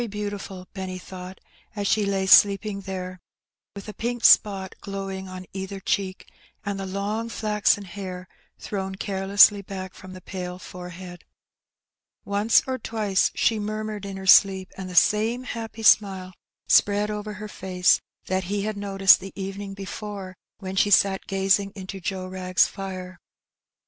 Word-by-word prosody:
25 235 Hz, -, -5 dB, 0.3 s
beantifal^ 185 Hz, -2 st, -9 dB
Benny 190 Hz, -1 st, -5 dB
thought, 185 Hz, 0 st, -10 dB, 0.4 s
as 205 Hz, -1 st, -3 dB
she 205 Hz, 0 st, +2 dB
lay 195 Hz, -1 st, 0 dB
sleeping 200 Hz, +1 st, +5 dB
there, 185 Hz, -1 st, -6 dB, 0.6 s
with 200 Hz, +1 st, -9 dB
a 210 Hz, -, -6 dB
pink 240 Hz, +2 st, -3 dB
spot 195 Hz, -3 st, +5 dB
glowing 195 Hz, -1 st, -5 dB
on 185 Hz, 0 st, -8 dB
either 190 Hz, +1 st, -5 dB
cheek, 190 Hz, 0 st, -2 dB, 0.4 s
and 200 Hz, -1 st, -3 dB
the 195 Hz, -, -4 dB
long 205 Hz, +4 st, -3 dB
flaxen 210 Hz, -2 st, +1 dB
hair 185 Hz, -1 st, -7 dB, 0.3 s
thrown 190 Hz, -2 st, -4 dB
carelessly 200 Hz, +1 st, +4 dB
back 190 Hz, -1 st, -7 dB
from 185 Hz, 0 st, -12 dB
the 185 Hz, -, -9 dB
pale 180 Hz, -1 st, -6 dB
forehead. 180 Hz, 0 st, -10 dB, 1.0 s
Once 205 Hz, +3 st, +3 dB
or 260 Hz, -1 st, -3 dB
twice 210 Hz, -4 st, 0 dB
she 225 Hz, -2 st, +2 dB
murmured 215 Hz, 0 st, -4 dB
in 195 Hz, -1 st, -6 dB
her 190 Hz, -, -7 dB
sleep, 190 Hz, 0 st, +5 dB
and 190 Hz, -1 st, -7 dB
the 180 Hz, -, -8 dB
same 220 Hz, +7 st, +3 dB
happy 225 Hz, -2 st, -6 dB
smile 190 Hz, -3 st, +3 dB, 0.3 s
spread 205 Hz, +1 st, +3 dB
over 210 Hz, 0 st, -5 dB
her 210 Hz, +2 st, -7 dB
face 185 Hz, -3 st, +1 dB, 0.2 s
that 185 Hz, 0 st, -1 dB
he 200 Hz, +2 st, -2 dB
had 215 Hz, 0 st, -2 dB
noticed 195 Hz, -1 st, +5 dB
the 195 Hz, -, -9 dB
evening 195 Hz, +1 st, -5 dB
before 195 Hz, -1 st, -7 dB, 0.2 s
when 190 Hz, -1 st, -6 dB
she 205 Hz, -, +3 dB
sat 195 Hz, 0 st, +3 dB
gazing 195 Hz, +1 st, +1 dB
into 195 Hz, 0 st, -7 dB
Joe 185 Hz, 0 st, -4 dB
Wrag's 185 Hz, -1 st, +1 dB
fire. 185 Hz, -2 st, -7 dB
195 Hz, 155 wpm, -25 LUFS, 185-205 Hz, 1.0 s, sleeping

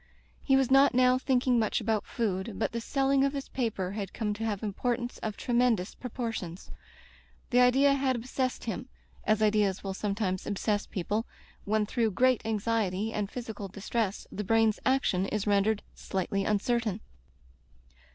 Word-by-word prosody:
He 270 Hz, -, +4 dB
was 270 Hz, -1 st, +2 dB
not 270 Hz, -1 st, +6 dB
now 255 Hz, 0 st, +5 dB
thinking 255 Hz, -2 st, +2 dB
much 215 Hz, -2 st, +1 dB
about 220 Hz, -2 st, -1 dB
food, 205 Hz, -2 st, -2 dB
but 220 Hz, -, 0 dB
the 235 Hz, -, -3 dB
selling 275 Hz, +2 st, +2 dB
of 275 Hz, 0 st, +1 dB
his 275 Hz, -1 st, -5 dB
paper 215 Hz, -7 st, -2 dB
had 200 Hz, -2 st, -5 dB
come 215 Hz, -3 st, -1 dB
to 215 Hz, +2 st, -5 dB
have 210 Hz, -3 st, -2 dB
importance 240 Hz, +4 st, -2 dB
of 215 Hz, -2 st, -4 dB
tremendous 235 Hz, -6 st, +1 dB
proportions. 225 Hz, -8 st, -5 dB, 0.8 s
The 245 Hz, -, +4 dB
idea 265 Hz, +3 st, +5 dB
had 265 Hz, -2 st, +1 dB
ob 230 Hz, -, -5 dB
sessed 255 Hz, 0 st, -2 dB
him, 235 Hz, +3 st, -4 dB, 0.4 s
as 215 Hz, 0 st, +2 dB
ideas 210 Hz, -2 st, +2 dB
will 195 Hz, -1 st, -3 dB
sometimes 200 Hz, -2 st, -2 dB
obsess 205 Hz, +1 st, -1 dB
people 205 Hz, +5 st, -2 dB, 0.4 s
when 215 Hz, +1 st, +1 dB
through 225 Hz, +1 st, +1 dB
great 255 Hz, -1 st, +3 dB
anxiety 220 Hz, -1 st, 0 dB
and 205 Hz, -2 st, -2 dB
phys 235 Hz, -2 st, -6 dB
ical 200 Hz, -2 st, -7 dB
distress 210 Hz, 0 st, -2 dB
the 210 Hz, -, -4 dB
brain's 225 Hz, +1 st, +3 dB
action 255 Hz, -8 st, +2 dB
is 210 Hz, 0 st, -2 dB
rendered 205 Hz, +1 st, +2 dB
slightly 195 Hz, +1 st, -2 dB
uncertain. 215 Hz, 0 st, 0 dB
220 Hz, 160 wpm, -29 LUFS, 205-250 Hz, 0.8 s, not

